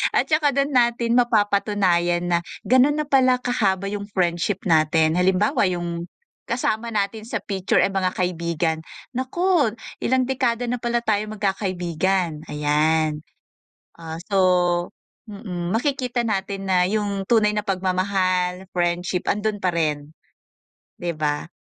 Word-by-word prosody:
at - - +4
tsaka 305 -2 +3
do'n 280 +1 +1
natin 240 -1 +2
mapapatunayan 200 -6 +2
na 170 - +3 0.2
gano'n 260 +4 +4
na 305 0 -1
pala 255 -2 +4
kahaba 200 -6 0
yung 205 0 -4
friendship 175 +2 0
natin. 160 +1 +3
Halimbawa, 185 +3 +2
yung 175 -1 -3 0.4
kasama 235 -1 -1
natin 215 +1 -1
sa 235 - -3
picture, 195 -2 0
eh, - - +2
mga 185 -1 0
kaibigan 170 -2 -1 0.4
"Naku 285 - +1 0.3
ilang 255 0 +2
dekada 245 -2 0
na 245 - 0
pala 240 0 0
tayong 215 -1 -1
magkakaibigan," 185 -4 -1
ayan. 150 +1 +1 0.8
Ah, 160 -1 -7
so - - -2 0.9
mm, 185 -3 -5
makikita 250 -1 0
natin 195 -2 -2
na 180 -1 +4
yung 200 -2 -2
tunay 220 -3 +4
na 210 0 -1
pagmamahal, 185 -1 0
friendship 175 0 -1
andun 210 0 0
parin, 155 -4 -1 0.9
di 175 -1 -1
ba? 150 +1 -2
195 Hz, 125 wpm, -22 LUFS, 175-230 Hz, 0.9 s, at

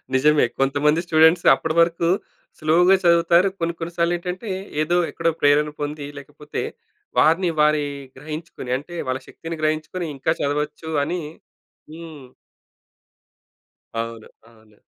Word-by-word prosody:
నిజమే 150 +1 +4
కొంతమంది 145 +4 +2
స్టూడెంట్స్ 160 +1 +5
అప్పటివరకు 170 +1 +1 0.5
స్లో‌గా 175 +4 +4
చదువుతారు. 170 +2 +4
కొన్ని 170 0 -1
కొన్ని 165 0 -4
సార్లెటంటే 175 +4 -1 0.3
ఏదో 175 +3 +1
ఎక్కడో 165 0 0
ప్రేరణ 145 +1 +4
పొంది 145 0 -4
లేకపోతే 145 +1 -7 0.6
వారిని 170 +3 +4
వారి 150 -1 +3 0.3
గ్రహించుకొని 155 -3 -7
అంటే 165 +6 -10
వాళ్ళ 130 0 -1
శక్తిని 165 0 -7
గ్రహించుకొని 155 +3 -1
ఇంకా 135 +4 0
చదవచ్చు 150 +2 -2
అని 175 +4 -2 0.7
హ్మ్. 160 -4 -10 1.8
అవును. 115 -1 -7 0.2
అవును. 110 -2 -22
155 Hz, 110 wpm, -22 LUFS, 145-170 Hz, 1.8 s, స్టూడెంట్స్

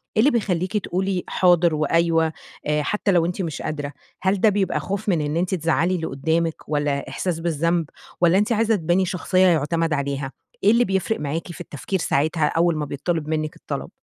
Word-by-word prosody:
إيه - - +2
اللي 275 +6 +5
بيخليكِ 195 -3 0
تقولي 190 -1 -1
حاضر 175 -3 +3
وأيوه، 165 +1 +2 0.3
آآ 150 0 +1
حتى 210 +2 0
لو 170 -2 +3
أنتِ 180 +2 -2
مش 160 -4 -4
قادرة؟ 145 -2 -4 0.3
هل 190 0 +1
ده 220 - +6
بيبقى 200 -1 0
خوف 200 +2 -3
من 165 -5 +2
إن 150 +2 -1
أنتِ 185 +2 0
تزَعّلي 165 +2 +1
اللي 160 -2 -3
قدّامِك؟ 160 +4 0
والَّا 145 -2 -1
إحساس 165 +4 -2
بالذنب؟ 165 0 0 0.4
والَّا 175 +2 +5
أنتِ 210 +3 +1
عايزة 225 0 +3
تباني 175 +1 +1
شخصية 185 +1 +2
يعتمد 165 0 +1
عليها؟ 140 -1 -2 0.3
إيه 205 - +6
اللي 240 +1 +4
بيفرق 190 +3 -1
معاكِ 160 +4 -3
في 175 - -9
التفكير 175 +4 -4
ساعتها 155 +1 +1
أول 170 +1 +2
ما 150 - -2
بيتطلب 150 +3 -2
منِّك 155 -1 -2
الطلب؟ - - -5
170 Hz, 190 wpm, -23 LUFS, 155-185 Hz, 0.4 s, ده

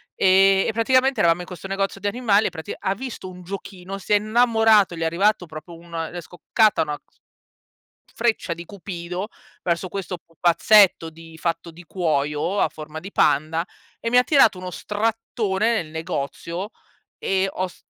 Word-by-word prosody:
E 195 +1 +5
e - - +1
praticamente 260 +4 +2
eravamo 170 +1 +3
in 175 - -8
questo 180 +1 -8
negozio 195 0 -2
di 205 - -10
animali 215 -1 +2
e - - -1
pratic 160 -2 -7
ha 190 - 0
visto 250 -5 -7
un 180 0 -11
giochino, 190 0 -7
si 195 +2 -2
è 205 - +7
innamorato, 220 -3 +3
gli 165 - -7
è - - +1
arrivato 185 +3 +1
proprio 155 +2 -10
un 170 +1 -16 0.2
è 175 - -5
scoccata 210 +5 +1
una 150 -1 -4
cs - - -39 1.0
freccia 225 -6 0
di 170 - -9
cupido 180 0 -6 0.3
verso 175 +1 -1
questo 185 -1 -5
pupazzetto 175 +2 +4
di 165 0 -14
fatto 170 0 -2
di 170 +2 -14
cuoio, 160 +1 -1
a - - +3
forma 155 0 -9
di 195 +4 -9
panda 155 +4 +2 0.4
e 230 - -2
mi 245 - +5
ha - - +7
tirato 245 -10 +4
uno 185 0 -6
strattone 220 +1 -1
nel 165 - -3
negozio 165 - -4 0.5
e 195 0 0
ho 185 0 -2
s - - -18
185 Hz, 175 wpm, -23 LUFS, 170-210 Hz, 1.0 s, è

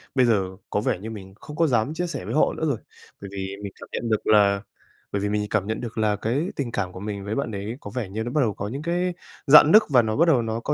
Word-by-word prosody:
bây 130 - +5
giờ 105 -5 +2 0.2
có - - 0
vẻ 90 - 0
như 110 - -7
mình 95 -4 -9
không 150 - -10
có 165 +1 +3
dám 125 +1 +1
chia 175 +2 -2
sẻ 165 - -5
với - - -4
họ 155 - +3
nữa 160 - -1
rồi, 140 -6 0 0.4
bởi 100 - -7
vì 95 0 -4
mình 100 - -5
cảm - - -11
nhận 115 - -3
được 110 -1 0
là 100 -2 +4 0.5
bởi 100 - -1
vì 105 - -1
mình 105 0 0
cảm 100 -2 0
nhận 110 0 -3
được 115 -2 -7
là 105 -1 +2
cái 125 - -1
tình 130 -5 -3
cảm 95 -5 -2
của 95 - -9
mình 100 0 -5
với 105 +2 -3
bạn 140 -5 -2
đấy 105 +4 -5
có 100 - -8
vẻ 120 -6 -3
như 110 +3 -3
nó 120 - -4
bắt 150 - +2
đầu 110 -6 +1
có 100 0 -5
những 135 +7 -5
cái 175 +2 -1 0.3
rạn 150 +2 +9
nứt 215 +3 +8
và 130 -4 +6
nó 110 -1 -2
bắt 170 +3 +3
đầu 140 -7 +4
nó 115 0 -2
có 140 +5 -1
110 Hz, 300 wpm, -24 LUFS, 100-140 Hz, 0.5 s, rạn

